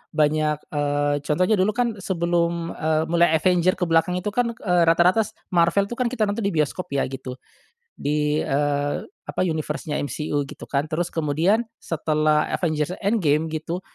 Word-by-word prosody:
banyak, 150 0 +2 0.2
eee, 145 0 0
contohnya 180 +9 +1
dulu, 205 +3 +2
kan, 235 -4 0
sebelum, 170 -2 -1
eee, 155 0 0
mulai 170 -2 +4
Avengers 180 +2 +3
ke - - -3
belakang 165 +1 +2
itu, 195 +3 -2
kan, 235 +1 0
eee, 180 -5 +2
rata-rata 175 +5 +4
s - - -16 0.2
Marvel 170 +2 +3
itu, 240 - -3
kan, 250 - +2
kita 230 -3 -1
nonton 205 +2 -1
di 200 -5 -1
bioskop, 155 +4 -1
ya, 135 - +2
gitu. 130 -1 -6 0.6
Di, 150 +1 0
eee, 145 +1 0 0.3
apa - - -3
universe-nya 155 -2 -2
MCU 145 +1 -2
gitu, 150 +1 -10
kan. 140 +1 0
Terus 175 +2 0
kemudian 165 +8 +1 0.2
setelah 155 -1 +1
Avengers 155 -2 -1
Endgame 160 -7 +2
gitu, 160 +3 -4
165 Hz, 165 wpm, -23 LUFS, 150-185 Hz, 0.6 s, mulai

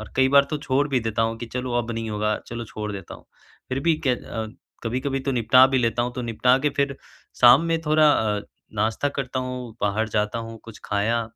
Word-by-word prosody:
और 110 - -10
कई 130 0 +4
बार 140 0 +7
तो 150 - -1
छोड़ 140 0 +1
भी 135 -3 +1
देता 115 -1 -1
हूँ 115 0 -1
कि 120 - -6
चलो, 125 +1 -4
अब 120 -1 -3
नहीं 115 -1 -4
होगा 105 0 0
चलो 120 0 -6
छोड़ 105 -1 -6
देता 95 -3 -8
हूँ। - - -15 0.4
फिर 130 +1 -2
भी 165 +3 +3
के - - +4
अ, 115 -2 -3 0.4
कभी-कभी 130 +4 -2
तो 135 +1 -2
निपटा 125 +2 +6
भी 135 - +3
लेता 115 -1 +1
हूँ 120 0 -3
तो 125 - -4
निपटा 120 +2 +2
के 145 +2 0
फिर 140 -1 0 0.4
शाम 125 +5 +8
में 165 -1 0
थोड़ा 155 -1 +4
अ, 105 -2 0 0.3
नाश्ता 110 +6 0
करता 130 -1 -2
हूँ, 125 -3 -6
बाहर 105 +2 0
जाता 105 +2 0
हूँ। 115 0 -7
कुछ 115 -2 -12
खाया, 110 +3 0
120 Hz, 225 wpm, -24 LUFS, 110-130 Hz, 0.4 s, शाम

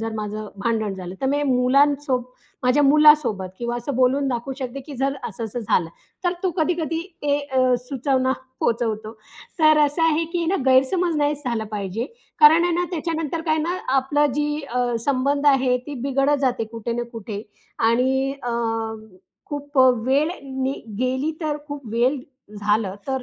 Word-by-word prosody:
जर 225 0 -3
माझं 215 0 -4 0.2
भांडण 220 -3 0
झालं 185 -1 -7
तर 265 - 0
मी 285 +2 +1
मुलांसोबत 270 0 +2 0.4
माझ्या 250 +4 +3
मुलांसोबत 285 -9 +5
किंवा 240 0 -2
असं 240 +4 -4
बोलून 260 +2 +3
दाखवू 245 +1 -3
शकते, 260 0 -5
की 280 +2 -10
जर 275 +2 0
असं-असं 225 +2 -5
झालं. 180 -6 +1 0.4
तर 355 - +2
तो 375 - +1
कधी-कधी 325 -1 0 0.2
ते 285 0 +2
अ, 260 -3 +1
सुचवना 260 +1 0 0.3
पोहचवतो. 220 -2 -1 0.5
तर 310 -1 +6
असं 295 +3 -1
आहे 325 0 +3
की 345 -1 0
ना 385 - +2
गैरसमज 305 +7 +3
नाहीच 290 0 0
झाला 235 -3 -1
पाहिजे. 210 +3 -3 0.3
कारण 315 +3 +8
आहे 350 - +1
ना 355 +1 +1
त्याच्यानंतर 325 -1 -2
काय 315 0 +2
ना 340 +4 -1 0.2
आपलं 290 +3 +2
जी 295 +1 -1
अ, 245 -1 0
संबंध 280 +1 +1
आहे 265 -3 +4
ती 295 - -5
बिघडत 275 +2 +2
जाते 250 -4 +1
कुठे 230 +1 -4
ना 240 +1 -2
कुठे 210 -2 -6 0.5
आणि 265 +3 +1
अ, 240 - -2 1.0
खूप 290 -1 -4 0.3
वेळ 285 +5 +2 0.7
गेली 260 +4 0
तर 305 -2 -1
खूप 285 -4 -7
वेळ 245 +5 +2 0.4
झालं 205 -1 0
तर 265 -2 -2
265 Hz, 160 wpm, -22 LUFS, 240-295 Hz, 1.0 s, कारण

